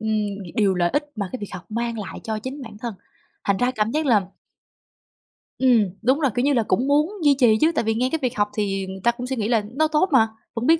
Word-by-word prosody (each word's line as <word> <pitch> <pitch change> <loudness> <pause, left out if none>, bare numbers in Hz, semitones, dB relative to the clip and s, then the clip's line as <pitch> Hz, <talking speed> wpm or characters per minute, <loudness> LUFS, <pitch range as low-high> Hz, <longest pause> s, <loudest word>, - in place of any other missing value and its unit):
ừm, 210 -2 -1
điều 200 -3 +3
lợi 175 -1 +1
ích 295 +1 0
mà 200 -3 -2
cái 255 - -4
việc 205 - -7
học 180 0 -9
mang 235 0 -2
lại 200 - -6
cho 220 -1 -2
chính 265 +5 -6
bản 215 -3 -10
thân, 230 -2 -5 0.5
thành 200 -1 +2
ra 245 +3 +1
cảm 220 -2 -1
giác 310 +2 -1
là 220 -5 +5 1.4
Ừm, 235 -7 +4
đúng 260 +6 +2
rồi. 275 -6 +2
Kiểu 245 - +1
như 285 - +3
là, 235 -3 +2
cũng 255 +5 0
muốn 300 +5 +3
duy 285 -2 +5
trì 225 -4 +5
chứ, 320 +2 +5
tại - - +1
vì 220 0 +1
nghe 250 +3 0
cái 320 - 0
việc 250 -3 -2
học 205 0 +2
thì 195 -2 -1
người 190 0 -7
ta 235 - +5
cũng 245 +1 -6
suy 265 - -2
nghĩ 215 -2 -1
là 225 -3 +2
nó 315 +2 +3
tốt 310 +5 +2
mà, 225 -5 +5 0.3
vẫn 230 +1 -3
biết 325 0 +5
235 Hz, 265 wpm, -23 LUFS, 210-265 Hz, 1.4 s, là